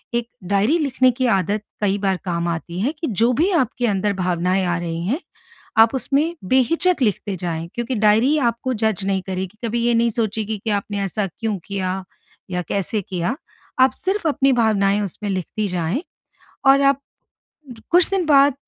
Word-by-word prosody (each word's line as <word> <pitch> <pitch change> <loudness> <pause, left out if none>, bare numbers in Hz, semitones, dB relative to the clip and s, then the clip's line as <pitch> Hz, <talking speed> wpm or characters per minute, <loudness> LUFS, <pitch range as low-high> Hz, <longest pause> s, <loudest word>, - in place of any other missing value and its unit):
एक 235 -1 -1 0.2
डायरी 210 +11 +3
लिखने 260 -4 +3
की 255 +2 -2
आदत 200 0 +1 0.2
कई 200 -1 +1
बार 195 -2 0
काम 170 -1 -1
आती 170 +1 -4
है 255 +7 +1
कि 325 - -2
जो 235 - +5
भी 350 +6 +3
आपके 250 - +1
अंदर 200 0 0
भावनाएँ 180 +1 0
आ 175 -1 0
रही 165 -1 -4
हैं 270 +9 0 0.6
आप 225 +4 +6
उसमें 295 +6 +1
बेहिचक 275 - +2
लिखते 205 -3 0
जाएँ, 165 -1 -4
क्योंकि 240 +1 -2
डायरी 220 +8 +4
आपको 240 0 0
जज़ 215 -4 -1
नहीं 190 -1 0
करेगी, 190 +2 -5
कभी 230 +1 -1
ये 240 - +3
नहीं 235 0 +3
सोचेगी 220 -1 -2
कि 225 - -2
आपने 205 0 -2
ऐसा 200 +2 -1
क्यों 210 +3 -3
किया? 190 -1 -3 0.5
या 180 0 -1
कैसे 200 +2 -1
किया? 185 +6 -2 0.4
आप 260 0 +6
सिर्फ़ 380 +5 -2
अपनी 275 -2 +2
भावनाएँ 205 -2 +2
उसमें 205 +1 -4
लिखती 195 +3 -2
जाएँ 180 - -1 0.6
और 270 +1 +6
आप 275 0 +3 0.9
कुछ 350 0 +5
दिन 385 -3 0
बाद 285 -2 +5
215 Hz, 175 wpm, -21 LUFS, 190-260 Hz, 0.9 s, आप